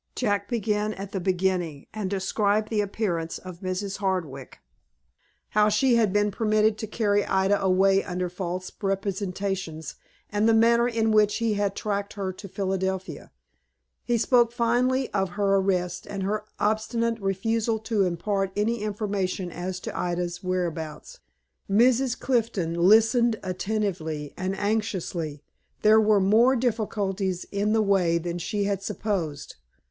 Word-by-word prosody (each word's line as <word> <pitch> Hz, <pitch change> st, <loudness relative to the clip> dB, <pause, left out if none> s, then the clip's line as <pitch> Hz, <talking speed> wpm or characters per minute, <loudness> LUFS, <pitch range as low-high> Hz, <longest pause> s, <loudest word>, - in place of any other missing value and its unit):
Jack 205 Hz, -5 st, 0 dB
began 215 Hz, -2 st, -1 dB
at 195 Hz, 0 st, -7 dB
the 195 Hz, -, -2 dB
beginning, 180 Hz, -5 st, -1 dB
and 210 Hz, -3 st, -3 dB
described 205 Hz, +2 st, 0 dB
the 215 Hz, -2 st, +1 dB
appearance 190 Hz, -5 st, -2 dB
of 180 Hz, -2 st, -10 dB
Mrs. 190 Hz, +1 st, -3 dB
Hardwick; 175 Hz, -10 st, -3 dB, 0.9 s
how 210 Hz, 0 st, +3 dB
she 240 Hz, +5 st, +3 dB
had 225 Hz, -4 st, +3 dB
been 205 Hz, +1 st, +2 dB
permitted 215 Hz, 0 st, +2 dB
to 220 Hz, -, -4 dB
carry 205 Hz, -2 st, +1 dB
Ida 190 Hz, +1 st, +1 dB
away 195 Hz, +1 st, +3 dB
under 180 Hz, 0 st, -3 dB
false 180 Hz, 0 st, -5 dB
representations, 195 Hz, -5 st, -3 dB, 0.4 s
and 210 Hz, +2 st, +2 dB
the 225 Hz, -, +5 dB
manner 235 Hz, +1 st, +4 dB
in 225 Hz, -2 st, +1 dB
which 210 Hz, -1 st, +4 dB
he 230 Hz, -2 st, 0 dB
had 200 Hz, -1 st, -1 dB
tracked 200 Hz, -1 st, -3 dB
her 195 Hz, -2 st, -3 dB
to 200 Hz, +2 st, -10 dB
Philadelphia. 190 Hz, 0 st, -3 dB, 0.7 s
He 240 Hz, -1 st, +1 dB
spoke 240 Hz, 0 st, +3 dB
finally 245 Hz, +3 st, +1 dB
of 195 Hz, -2 st, -1 dB
her 200 Hz, -1 st, +3 dB
arrest, 180 Hz, -2 st, -1 dB
and 195 Hz, -1 st, -4 dB
her 210 Hz, +2 st, -2 dB
obstinate 225 Hz, +2 st, 0 dB
refusal 220 Hz, +4 st, 0 dB
to 220 Hz, -2 st, 0 dB
impart 190 Hz, +2 st, -1 dB
any 220 Hz, +2 st, 0 dB
information 200 Hz, -3 st, -2 dB
as 180 Hz, +2 st, -4 dB
to -, -, -6 dB
Ida's 175 Hz, 0 st, -2 dB
whereabouts. 180 Hz, -, -3 dB, 0.5 s
Mrs. 245 Hz, +4 st, +3 dB
Clifton 220 Hz, -9 st, 0 dB
listened 220 Hz, +6 st, +4 dB
attentively 185 Hz, -6 st, -3 dB
and 185 Hz, +1 st, -3 dB
anxiously. 190 Hz, -8 st, -2 dB, 0.4 s
There 215 Hz, +1 st, +6 dB
were 210 Hz, -1 st, +4 dB
more 225 Hz, +7 st, +4 dB
difficulties 205 Hz, -6 st, -1 dB
in 205 Hz, +2 st, 0 dB
the 220 Hz, -1 st, +3 dB
way 185 Hz, -4 st, +2 dB
than 170 Hz, +1 st, -3 dB
she 205 Hz, +4 st, -2 dB
had 200 Hz, -1 st, -1 dB
supposed. 180 Hz, -9 st, -3 dB
200 Hz, 140 wpm, -26 LUFS, 185-215 Hz, 0.9 s, There